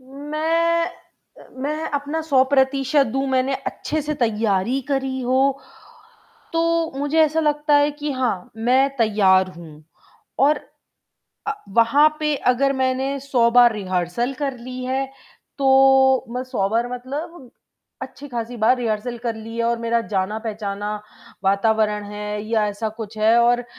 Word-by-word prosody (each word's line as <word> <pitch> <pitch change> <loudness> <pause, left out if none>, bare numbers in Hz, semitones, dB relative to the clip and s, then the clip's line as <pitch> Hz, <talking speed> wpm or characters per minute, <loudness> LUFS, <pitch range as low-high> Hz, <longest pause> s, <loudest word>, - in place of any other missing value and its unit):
मैं 315 +5 -1 0.7
मैं 305 +3 -2
अपना 290 +2 -2
100 275 -5 +3
प्रतिशत 270 0 +2
दूँ, 270 +4 -2
मैंने 260 +1 +1
अच्छे 310 - -3
से 300 +1 -3
तैयारी 220 +2 +1
करी 270 -1 -1
हो, 265 +2 +1 0.9
तो 330 -1 +1
मुझे 290 +3 0
ऐसा 315 +1 +3
लगता 295 -1 +1
है 290 +1 +3
कि 295 0 -5
हाँ, 245 -8 -2
मैं 255 +4 +2
तैयार 195 -4 +3
हूँ 155 -3 -12 0.6
और 290 +2 +4 0.9
अ, 430 - 0 0.2
वहाँ 275 +7 +5
पे 300 -1 +1 0.2
अगर 275 +2 +1
मैंने 265 +1 -1
100 250 -4 +2
बार 240 0 +6
रिहर्सल 185 +5 -2
कर 275 -3 -2
ली 255 +1 -7
है, 265 +1 -1 0.5
तो 265 -1 +5
मैं 250 - -2
100 195 -6 -1
बार 230 +3 0
मतलब 270 +3 -7 0.5
अच्छी 285 - -9
खासी 240 -1 -5
बार 225 +4 +3
रिहर्सल 235 0 -2
कर 230 -1 -3
ली 225 +1 -8
है 235 - 0
और 235 0 0
मेरा 230 0 0
जाना 195 +3 -1
पहचाना 210 -2 -4 0.5
वातावरण 210 +1 +1
है 210 0 -4
या 220 -2 +1
ऐसा 205 +2 -3
कुछ 220 0 -7
है 220 +2 +4
और 240 +1 +2
255 Hz, 145 wpm, -21 LUFS, 220-280 Hz, 0.9 s, बार